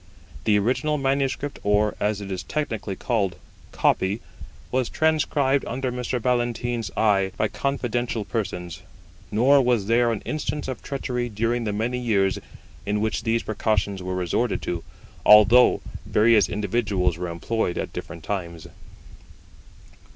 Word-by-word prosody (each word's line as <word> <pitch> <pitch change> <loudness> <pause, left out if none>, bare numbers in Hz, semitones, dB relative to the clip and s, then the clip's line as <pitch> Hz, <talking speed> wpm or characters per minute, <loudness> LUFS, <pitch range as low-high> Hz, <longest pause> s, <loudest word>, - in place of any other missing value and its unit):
The 105 -1 +4
original 130 +8 +1
manuscript, 135 +1 -1
or, 105 +1 +2
as 105 0 0
it 100 -1 -6
is 95 -1 -3
technically 110 - -3
called, 100 -7 -1 0.4
copy, 95 +4 +1 0.5
was 130 -1 0
transcribed 150 -4 +2
under 130 +1 -2
Mr. 125 0 -2
Ballantyne's 120 -2 -1
eye 100 -3 +3
by - - +2
confidential 120 -5 -2
persons; 90 -8 -4 0.5
nor 135 +6 +5
was 120 -5 +2
there 115 +2 +3
an 110 - -3
instance 150 -1 -3
of 130 - -5
treachery 125 -3 -3
during 115 +2 -1
the 105 - -1
many 115 +4 -1
years 100 -6 +1 0.4
in 105 +1 -1
which 110 0 -1
these 115 0 0
precautions 100 -3 -1
were 90 0 -3
resorted 90 +6 0
to, 85 -1 -3 0.4
although 105 +4 +7 0.3
various 110 -1 +4
individuals 100 -4 0
were 90 - -2
employed 90 +3 -2
at - - -4
different 85 -1 -7
times. 85 -5 -4
110 Hz, 135 wpm, -24 LUFS, 100-125 Hz, 0.5 s, although